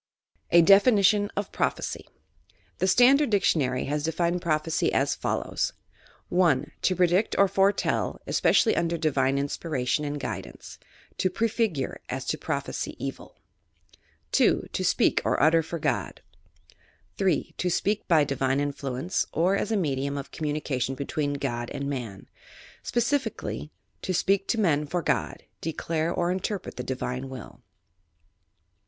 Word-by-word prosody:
A 170 0 +6
DEPWmON 205 +1 +5
OP 205 -1 -2
PBOPHECY - - -2 0.7
The 185 - +1
Standard 260 +8 +5
Dictionary 150 - +1
has 150 +2 -1
defined 170 +3 0
prophecy 155 -1 0
as - - +1
follows: - - -2 0.3
— - - -28 0.2
1. 155 -5 +2
To 185 - +2
predict 180 +4 +2
or 200 - +6
foretell, 195 +1 +1
especially 225 - +3
tmder 170 0 0
divine 135 -4 +1
in 140 - 0
miration 145 -2 -2
and 145 0 -3
guidance; - - -7 0.4
to 185 - +2
prefigure, 220 - -1
as - - -4
to - - -1
prophesy - - -3
evil. - - -7 0.9
2. - - +2
To - - -1
speak - - +2
or - - +1
utter 165 +2 +5
for 165 +1 -5
God. 155 - -2 1.0
3. 190 -5 +1
To 180 - 0
speak 205 +4 0
by 160 -4 +5
divine 135 -1 0
influence, 140 +2 -2
or 180 +4 +2
as 210 - -2
a 220 - +2
medium 140 -5 -1
of 140 - -6
communication 145 -4 -2
between 145 +1 -2
God 120 -4 -3
and 140 - -4
Man. 120 -9 -5 0.5
Specifically: 240 - -2 0.3
To 185 - -2
apeak 195 +2 +1
to 230 - 0
men 150 -7 +2
for 175 +3 -2
God) - - -1 0.2
declare 165 0 -2
or 175 0 0
interpret 190 +1 -4
the 125 - -3
divine 130 0 -4
will. 130 -5 -10
165 Hz, 140 wpm, -26 LUFS, 140-190 Hz, 1.0 s, A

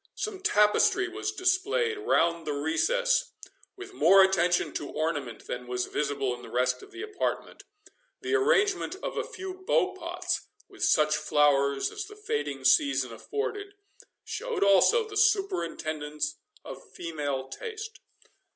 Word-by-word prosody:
Some 430 -3 -4
tapestry 365 - +3
was 390 +4 -4
displayed 410 +6 +1
around 170 - +1
the 150 - -2
recess, - - +1 0.4
with 385 0 -10
more 195 - +6
attention 180 -2 +2
to 145 - -4
ornament 145 -8 -3
than 125 0 -6
was 125 0 -2
visible 140 -3 -1
in 120 - -9
the - - -11
rest 125 +1 0
of - - -13
the 365 +2 -8
apartment; 420 -1 -4 0.5
the 380 -1 -3
arrangement 405 -3 +2
of - - -4
a - - -1
few 375 0 -7
bow 375 0 0
pots, - - -3 0.2
with - - -8
such 150 0 +3
flowers 145 -2 +2
as 425 -1 -5
the 420 - -12
fading 145 - -3
season 130 -2 +3
afforded, 410 - -5 0.5
showed 485 - -3
also 200 - +5
the 420 - -9
superintendence 165 - 0 0.3
of - - -8
female 145 -5 -3
taste. 445 - -7
195 Hz, 140 wpm, -28 LUFS, -, 0.5 s, more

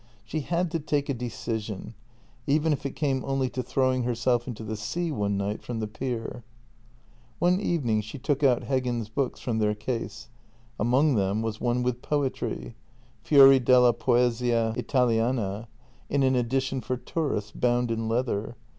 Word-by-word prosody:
She 155 - -3
had 170 +3 -1
to 165 - -1
take 145 -1 -1
a - - +2
decision 115 -4 -4 0.3
— 115 - -32
even 150 +2 +3
if 140 - -3
it 135 - -9
came 135 -4 0
only 135 -2 -1
to 125 - -2
throwing 130 +1 +1
herself 120 0 0
into 115 -3 -6
the 110 0 -4
sea 165 +11 -3
one 100 -6 -1
night 100 +2 -2
from 120 -2 -5
the 110 - -1
pier. 120 +1 -5 0.9
One 180 +2 +3
evening 125 - +1
she 110 +6 -8
took 140 +2 -1
out 125 -3 +4
Heggen's 125 -5 -1
books 125 +3 -2
from 115 -3 -1
their 105 -1 +1
case. 110 -1 -5 0.5
Among 130 +7 +3
them 100 0 +1
was 110 -1 -4
one 125 0 +1
with 125 0 -1
poetry 130 - -2 0.3
— - - -32
Fxori 135 -3 +7
della 125 -1 +6
Poesia 120 -1 +1
Italiana 115 -3 0 0.2
— - - -31
in 140 -1 +2
an 130 0 +3
edition 130 +2 0
for 125 +3 -2
tourists, 120 -7 -2
bound 120 0 +1
in 115 0 -2
leather. 115 -1 -1
125 Hz, 170 wpm, -27 LUFS, 115-135 Hz, 0.9 s, Fxori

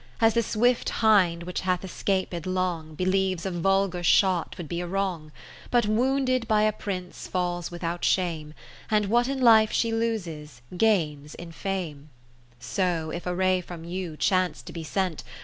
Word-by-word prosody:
As 225 -1 +4
the 235 - +3
swift 235 +3 +1
hind 185 -7 +3
which 180 +1 -4
hath 185 0 0
es 190 - -8
caped 185 -3 -1
long, 180 -4 -2
Believes 185 0 0
a 190 - -1
vulgar 195 +1 +1
shot 180 0 +2
would 175 - -6
be 170 +3 -3
a 175 - -4
wrong; 180 -5 -2 0.4
But 240 -2 +3
wounded 255 +2 +1
by 215 -1 +3
a 215 - +3
Prince 185 -4 -6
falls 175 -1 -2
with 175 +1 -9
out 170 +1 -3
shame, 160 -4 0 0.3
And 210 -2 +2
what 240 +4 +2
in 270 0 -2
life 220 -3 +6
she 230 - +1
loses, 165 - -3
gains 155 -8 +1
in 175 -1 -9
fame: 165 -5 -4 0.5
So 165 +4 -1
if 175 +2 -5
a 180 - -1
ray 185 0 +2
from 175 -2 -9
you 175 -2 -5
chance 185 0 +1
to - - -10
be 165 - -6
sent. 180 0 -2
185 Hz, 175 wpm, -26 LUFS, 170-210 Hz, 0.5 s, life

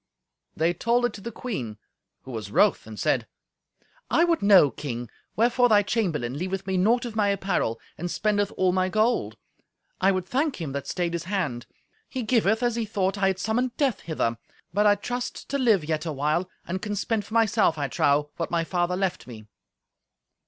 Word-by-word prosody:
They 165 +2 +2
told 235 +7 +1
it 240 - -1
to 200 - -9
the 235 - -6
queen, 130 - -5 0.5
who 130 - -9
was 110 -4 -5
wroth, 200 - +3
and 110 -1 -9
said, - - +1 0.8
"I 335 - +4
would 340 -1 +2
know, 195 -8 +6
King, 120 -2 -6 0.2
wherefore 245 +2 +3
thy 205 -2 +5
chamberlain 155 - -1
leaveth 190 +2 -3
me 190 -1 -1
naught 230 +7 +3
of 230 -3 -6
my 210 -2 +2
apparel, 190 - 0 0.2
and 175 +2 -3
spendeth 205 +1 0
all 185 -1 +3
my 185 0 +1
gold. 215 - +1 0.6
I 190 +1 +4
would 185 -2 -1
thank 275 - -1
him 160 -5 -4
that 140 0 -4
stayed 175 -2 -2
his 170 0 -3
hand. 170 -12 -2 0.4
He 255 - -3
giveth 220 0 +2
as 240 -1 +1
he 230 - 0
thought 200 -2 -1
I 195 - +3
had 190 -1 +1
summoned 235 +5 -1
Death 275 -7 +1
hither. 115 -8 -2 0.3
But 210 +2 +3
I 205 - +6
trust 245 +5 -5
to 280 - -1
live 220 - +3
yet 155 +1 -2
a - - -1
while, 150 +6 0 0.2
and 185 +2 -4
can 210 -1 -3
spend 210 +1 -1
for 220 +3 -8
myself, 215 -7 +3
I 145 -1 -1
trow, 145 +3 +1
what 165 - -2
my 170 -1 +1
father 175 +1 0
left 190 -6 -2
me." 110 -3 -10
190 Hz, 195 wpm, -26 LUFS, 160-220 Hz, 0.8 s, know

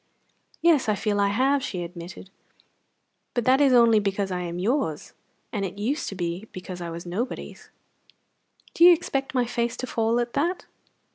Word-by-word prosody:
"Yes, 315 -9 +4
I 210 - +2
feel 205 0 -1
I 200 - +3
have," 265 +7 +2
she 180 -7 -4
admitted, 175 +2 -9 1.0
"but 240 -2 0
that 265 +2 +4
is 280 -2 +5
only 235 -3 +6
because 200 -1 -1
I 180 - -2
am 175 -1 -4
yours; 190 - -1 0.4
and 205 -3 -1
it 195 0 -5
used 250 +9 -2
to 195 - -7
be 175 +3 -4
because 180 -1 -8
I 170 - -4
was 170 +1 -7
nobody's!" 205 +9 -5 1.0
"Do 335 - +3
you 350 0 +10
expect 275 -5 -2
my 250 -1 +2
face 235 0 -2
to - - -3
fall 230 -1 0
at 240 0 -2
that?" 340 +6 -1
220 Hz, 180 wpm, -25 LUFS, 185-255 Hz, 1.0 s, you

